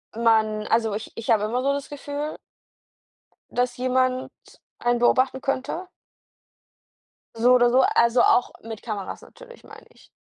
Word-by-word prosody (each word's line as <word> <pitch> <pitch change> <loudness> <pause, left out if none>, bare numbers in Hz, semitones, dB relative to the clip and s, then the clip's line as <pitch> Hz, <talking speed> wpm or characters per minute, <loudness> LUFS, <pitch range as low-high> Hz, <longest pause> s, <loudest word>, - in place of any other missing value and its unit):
man 220 -2 +2
also, 225 -2 +1
ich 215 +2 -6
ich 230 0 -7
habe 215 -2 +3
immer 240 +4 -1
so 275 - +2
das 280 0 -4
Gefühl 290 +1 -5 1.1
dass 245 0 -1
jemand 255 0 0 0.5
einen 240 0 +1
beobachten 260 +2 +2
könnte. 275 +7 -3 1.5
So 240 +2 +4
oder 245 -1 +4
so, 255 +2 +4
also, 235 +1 +4
auch 245 - +3
mit 225 -1 -8
Kameras 210 -4 -6
natürlich, - - -15
meine - - -14
ich. - - -21
245 Hz, 140 wpm, -24 LUFS, 225-260 Hz, 1.5 s, So